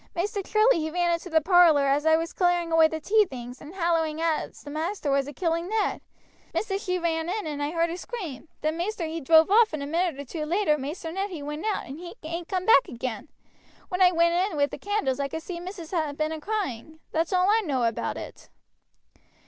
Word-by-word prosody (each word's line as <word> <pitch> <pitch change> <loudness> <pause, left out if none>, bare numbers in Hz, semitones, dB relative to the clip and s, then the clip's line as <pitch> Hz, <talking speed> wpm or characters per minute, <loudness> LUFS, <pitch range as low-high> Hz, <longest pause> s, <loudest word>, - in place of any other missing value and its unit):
Maister 400 +4 -1
Charlie 430 +1 +3
he 315 0 -2
ran 345 +1 +1
into 335 +2 -4
the 320 -1 +3
parlor 335 -4 +5
as 285 +3 +2
I 320 - +6
was 330 +1 -2
a - - -16
clearing 350 -2 +1
away 325 -1 +6
the' 315 0 -4
tea 425 +7 +4
things, 250 -4 -8
hallowing 330 -1 -1
out 325 -1 0
as - - -18
maister 310 +2 -2
was 275 0 +1
a - - -5
killing 335 +3 -1
Ned. 435 -1 0 0.5
Missis 400 -1 -1
she 365 -3 0
ran 330 -1 -1
in 420 +1 -2
and 295 -2 -4
I 290 - 0
heard 335 +1 0
a 345 - -4
scream, 355 - -7
then 310 +1 -1
maister 360 0 -2
he 320 +1 -4
drove 320 +5 +5
off, 440 -3 +5
and 295 -2 -3
a - - -3
minute 330 0 -1
or 285 - -6
two 305 +4 -5
later 350 -2 +2
Maister 310 +4 -5
Ned 390 +4 -2
he 325 -6 -7
went 300 +7 -4
out, 420 - -1
and 275 +4 -8
he 350 +3 -9
ain't 335 +2 -5
come 370 -1 -2
back 380 -11 +6
again. 240 +1 -5 0.6
When 365 +1 -2
I 365 - +8
went 340 0 +3
in 360 -1 0
with 285 0 +2
the - - -7
candles 390 -11 -1
I 280 - 0
could 320 +3 -6
see 345 -1 -6
missis 350 -2 -8
had 310 -5 -1
been 310 0 0
a 315 -1 -5
crying. 315 - -4
That's 325 +3 0
all 365 0 +3
I 450 +1 +4
know 270 -8 -1
about 230 -1 -1
it." - - -10
330 Hz, 235 wpm, -26 LUFS, 300-365 Hz, 0.6 s, I